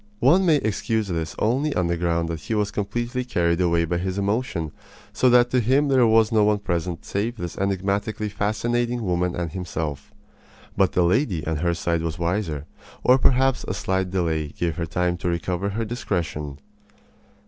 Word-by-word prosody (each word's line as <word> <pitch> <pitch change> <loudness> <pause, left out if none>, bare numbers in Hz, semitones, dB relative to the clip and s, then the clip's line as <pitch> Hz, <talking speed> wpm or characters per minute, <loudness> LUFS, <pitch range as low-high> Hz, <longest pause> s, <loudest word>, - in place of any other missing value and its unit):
One 185 +2 +4
may 160 - +6
excuse 110 -3 -1
this 80 -2 -3
only 135 +7 +1
on 90 - +1
the 85 0 0
ground 85 -1 0
that 80 -1 -3
he 110 +9 -3
was 105 -1 0
completely 120 +5 -2
carried 85 -7 +1
away 85 -1 +2
by 85 +1 -1
his 95 +1 -3
emotion, 100 -6 -1 0.4
so 130 - +3
that 120 0 +5
to 130 - +3
him 135 +5 +2
there 130 -3 +5
was 110 -1 +4
no 110 -2 +4
one 105 0 +3
present 85 -3 -3
save 115 +5 -2
this 85 -4 -5
enigmatically 100 +2 -1
fascinating 115 +3 -1
woman 90 -1 0
and 85 -2 -3
himself. 80 -5 -4 0.6
But 95 -2 +2
the 90 - +3
lady 90 - +1
on 80 -1 -1
her 85 +2 0
side 85 -1 -1
was 80 -1 -3
wiser; 85 -4 -2 0.4
or 130 +1 +5
perhaps 130 0 +3
a - - -2
slight 95 0 -1
delay 80 -5 0
gave 80 +1 -3
her 85 - -2
time 90 +1 0
to 90 - -2
recover 90 +3 -1
her 110 +3 -2
discretion. 85 - -3
95 Hz, 180 wpm, -24 LUFS, 85-115 Hz, 0.6 s, may